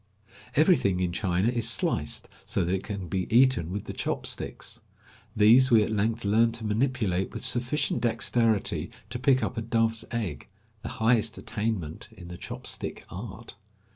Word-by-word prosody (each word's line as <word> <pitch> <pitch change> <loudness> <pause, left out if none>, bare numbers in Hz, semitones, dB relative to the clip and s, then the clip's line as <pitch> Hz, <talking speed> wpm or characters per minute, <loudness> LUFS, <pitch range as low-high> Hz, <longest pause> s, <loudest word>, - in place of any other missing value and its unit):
Everything 145 - +4
in 90 -1 0
China 95 +2 +1
is 120 -2 +1
sliced - - 0 0.2
so - - -1
that 90 - 0
it 95 - -1
can 100 -4 -5
be 95 +2 -2
eaten 120 -8 +4
with 100 +1 -3
the - - -7
chop - - -3
sticks. 120 - -4 0.5
These 115 +5 +6
we 115 -3 +6
at - - -3
length 110 +1 0
learned 115 +3 +3
to 115 -1 -3
manipulate 105 -5 0
with - - -4
sufficient 130 +4 0
dexterity 115 -2 +1 0.2
to 125 - -3
pick 130 0 +3
up 125 - -3
a - - 0
dove's 115 -1 0
egg 105 - -4 0.2
— 110 -1 -37
the - - -5
highest 115 0 +2
attainment 105 -8 -3
in 85 -1 -10
the 90 - -7
chop - - -8
stick - - -4
art. 105 +4 -8
110 Hz, 170 wpm, -27 LUFS, 95-120 Hz, 0.5 s, These